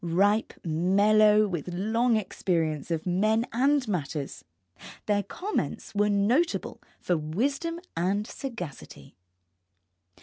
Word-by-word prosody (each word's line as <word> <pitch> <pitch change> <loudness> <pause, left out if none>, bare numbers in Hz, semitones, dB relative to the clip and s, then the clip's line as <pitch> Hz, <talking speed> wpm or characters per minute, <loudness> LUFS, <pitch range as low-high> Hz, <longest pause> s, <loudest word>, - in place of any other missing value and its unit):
Ripe, 200 +6 +2
mellow 210 +6 +4
with 180 -2 -4
long 225 +6 +1
experience 165 -7 -1
of 165 -2 -2
men 215 +6 +2
and 270 +2 +2
matters, 150 -7 -3 0.6
their 205 -1 +2
comments 395 - -4
were 205 0 +2
notable 230 +12 +1 0.2
for 180 - 0
wisdom 275 - -2 0.2
and 190 +5 0
sagacity. 230 - -8
205 Hz, 100 wpm, -27 LUFS, 175-230 Hz, 0.6 s, mellow